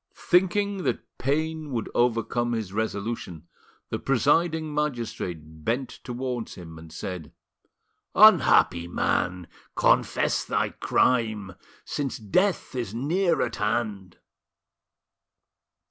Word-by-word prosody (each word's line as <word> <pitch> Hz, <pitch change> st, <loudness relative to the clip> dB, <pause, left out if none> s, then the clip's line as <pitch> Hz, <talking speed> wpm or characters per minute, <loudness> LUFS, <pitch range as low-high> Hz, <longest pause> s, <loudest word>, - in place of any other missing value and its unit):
Thinking 195 Hz, +3 st, +2 dB
that -, -, -4 dB
pain 155 Hz, +3 st, -1 dB
would 115 Hz, -2 st, -2 dB
overcome 120 Hz, 0 st, +1 dB
his 110 Hz, -5 st, -3 dB
resolution, 100 Hz, -6 st, -3 dB, 0.4 s
the -, -, -2 dB
presiding 155 Hz, +4 st, +1 dB
magistrate 110 Hz, -, -4 dB
bent 125 Hz, -, -1 dB
towards 125 Hz, -2 st, -4 dB
him, 80 Hz, -3 st, -10 dB
and 80 Hz, 0 st, -12 dB
said: 80 Hz, -1 st, -6 dB, 0.8 s
"Unhappy 85 Hz, 0 st, +6 dB
man! 90 Hz, 0 st, 0 dB, 0.3 s
confess -, -, +2 dB
thy -, -, 0 dB
crime, 110 Hz, -6 st, +1 dB, 0.3 s
since 140 Hz, -3 st, -3 dB
death 180 Hz, -, 0 dB
is 120 Hz, -5 st, -4 dB
near 170 Hz, +7 st, +1 dB
at 120 Hz, -, -3 dB
hand." 105 Hz, -4 st, -2 dB
120 Hz, 100 wpm, -26 LUFS, 95-145 Hz, 0.8 s, Unhappy